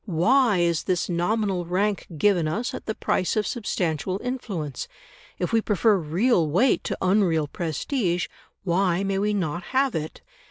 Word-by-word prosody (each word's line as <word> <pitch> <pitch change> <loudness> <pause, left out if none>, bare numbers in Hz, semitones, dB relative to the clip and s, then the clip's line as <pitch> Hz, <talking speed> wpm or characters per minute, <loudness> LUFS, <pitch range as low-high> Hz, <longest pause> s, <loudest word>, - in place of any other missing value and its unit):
Why 210 +6 +3
is 170 -2 +1
this 185 -1 0
nominal 185 +1 0
rank 195 +4 -1
given 180 -2 +3
us, 215 +11 -2
at - - -7
the 220 - -2
price 185 - 0
of 215 -1 +1
substantial 185 - -2
influence? 200 - -4 0.5
If 180 +5 -2
we 225 - +4
prefer 210 +1 +3
real 170 +2 +1
weight 200 - +2
to - - -2
unreal 185 -5 +3
prestige, 175 - -1 0.4
why 185 0 +1
may 195 0 0
we 210 +1 +1
not 175 -3 -2 0.2
have 270 -2 +3
it?" 155 0 -4
185 Hz, 155 wpm, -25 LUFS, 170-210 Hz, 0.5 s, we